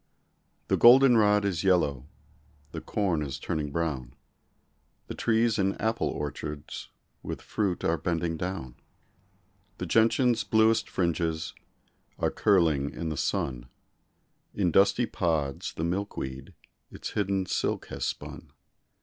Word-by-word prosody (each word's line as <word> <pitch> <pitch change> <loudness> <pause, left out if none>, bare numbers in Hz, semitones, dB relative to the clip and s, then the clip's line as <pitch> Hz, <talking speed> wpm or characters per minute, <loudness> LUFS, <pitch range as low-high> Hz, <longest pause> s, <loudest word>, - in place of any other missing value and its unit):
The - - +2
golden 125 +1 +8
rod 105 -1 +4
is 90 -5 -1
yellow; 75 -8 +2 0.6
The - - -6
corn 95 -7 -1
is 70 -2 -4
turning 75 +2 -3
brown; 70 -7 -3 0.9
The - - -6
trees 115 -1 +1
in 95 0 +1
apple 110 +1 -1
orchards 75 0 -5 0.3
With - - -5
fruit 100 -5 -2
are 85 0 +1
bending 85 -2 -1
down. 80 -8 -5 1.0
The - - -4
gentian's 115 +1 +3
bluest 110 0 +3
fringes 85 -2 -1 0.6
Are - - 0
curling 80 -8 +2
in 85 +1 -5
the 80 - -3
sun; 65 -3 -2 0.9
In 90 -4 +1
dusty 100 +7 +4
pods 80 -10 -1
the 80 - -4
milkweed 85 -7 -4 0.3
Its - - -7
hidden 100 -2 0
silk - - -1
has - - -5
spun. 80 - -5
85 Hz, 125 wpm, -28 LUFS, 75-105 Hz, 1.0 s, golden